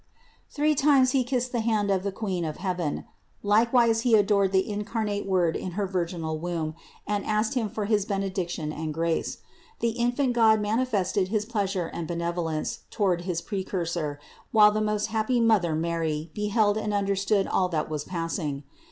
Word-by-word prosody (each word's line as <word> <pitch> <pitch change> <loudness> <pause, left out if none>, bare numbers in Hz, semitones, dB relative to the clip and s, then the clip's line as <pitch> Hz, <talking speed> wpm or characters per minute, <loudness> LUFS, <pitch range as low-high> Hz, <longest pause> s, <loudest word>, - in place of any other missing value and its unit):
Three 305 +1 +1
times 275 -3 +4
he 265 -1 +2
kissed 250 0 -1
the 240 - -1
hand 215 -3 +1
of 190 -2 +2
the 200 +1 -2
Queen 190 -4 -3
of 155 -2 -4
heaven; 180 -5 -2 0.4
likewise 225 +2 +4
he 235 -2 +4
adored 200 -2 +3
the 190 -1 +2
incarnate 210 -1 -2
Word 180 -4 +2
in 185 - -4
her 205 +2 -1
virginal 170 -4 -2
Womb, 165 -2 -3 0.3
and 205 -1 -1
asked 215 +1 0
Him 235 -5 0
for 210 +1 -3
his 210 -1 +2
benediction 185 -5 -2
and 155 -1 -4
grace. 165 0 -1 0.4
The 235 - +1
infant 245 +3 0
God 220 -2 +5
manifested 210 -4 0
his 210 +1 -1
pleasure 200 -5 -1
and 170 -2 -4
benevolence 170 -2 -2
toward 180 -5 0
his 175 -3 -2
Precursor, 170 -6 -3 0.3
while 210 -1 +7
the 215 +1 -1
most 210 0 0
happy 225 +3 +1
Mother 210 -8 +3
Mary 160 -1 -2
beheld 210 0 +1
and 210 -1 -2
understood 195 0 +1
all 185 -1 +1
that 155 -3 -1
was 150 -2 -3
passing. 165 -5 -3
200 Hz, 170 wpm, -26 LUFS, 170-220 Hz, 0.4 s, while